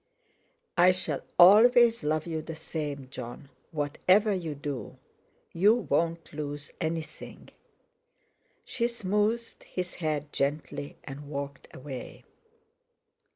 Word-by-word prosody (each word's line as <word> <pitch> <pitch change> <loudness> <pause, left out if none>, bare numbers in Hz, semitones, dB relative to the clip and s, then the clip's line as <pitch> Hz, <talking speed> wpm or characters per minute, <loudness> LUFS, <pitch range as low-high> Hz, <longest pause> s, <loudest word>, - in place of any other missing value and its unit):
"I 180 +1 +7
shall 165 -6 -3 0.2
always 230 +4 +7
love 155 +1 0
you 160 -2 -3
the 160 +1 -7
same, 150 -4 -5
Jon, 135 +3 -8 0.2
whatever 185 +7 +2
you 165 -5 -3
do. 140 -2 -5 0.6
You 205 +6 +5
won't 170 -8 -1
lose 145 -1 -5
anything." 160 -1 -5 1.2
She 235 -1 0
smoothed 220 +1 -1
his 180 -1 -5
hair 155 -3 -2
gently, 145 0 -2
and 140 +1 -8
walked 140 -1 -5
away. 130 -2 -8
160 Hz, 105 wpm, -29 LUFS, 145-190 Hz, 1.2 s, I